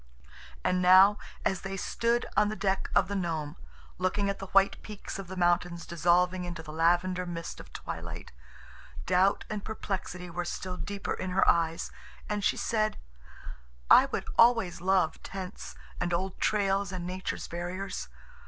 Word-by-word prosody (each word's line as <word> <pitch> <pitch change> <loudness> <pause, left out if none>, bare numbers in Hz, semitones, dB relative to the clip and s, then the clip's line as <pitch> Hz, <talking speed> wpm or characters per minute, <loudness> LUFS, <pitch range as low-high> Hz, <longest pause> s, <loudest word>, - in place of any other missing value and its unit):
And 180 0 +1
now, 190 +3 +7 0.3
as 190 - +1
they 195 0 -5
stood 235 +5 0
on 210 -1 +4
the 215 - -3
deck 195 -1 -1
of - - +4
the 200 - -4
Nome 160 -5 -2 0.4
looking 200 +2 +1
at 195 - -8
the 195 - -6
white 195 +1 +3
peaks 210 -2 -7
of 195 - -7
the 190 +1 -7
mountains 175 -1 +1
dissolving 180 +2 +2
into 175 -2 -6
the 155 -1 -9
lavender 175 +3 +2
mist 170 -1 -5
of - - -12
twilight, - - -7 0.7
doubt 185 +2 +3
and 210 -2 -4
perplexity 185 -4 -4
were 175 +1 -3
still 180 +1 -4
deeper 200 +3 -4
in 185 - -4
her 185 +1 +2
eyes, 165 -1 +2 0.4
and 210 -1 -2
she - - +2
said: 215 -1 0 0.9
"I - - +9
would - - -3
always 230 -8 +5
love 185 -3 +2
tents 190 -2 -7 0.2
and 175 0 -1
old 190 +2 -3
trails 195 -2 +1
and 180 -2 -4
nature's 185 +1 -4
barriers. 180 +3 -5
185 Hz, 160 wpm, -29 LUFS, 175-195 Hz, 0.9 s, I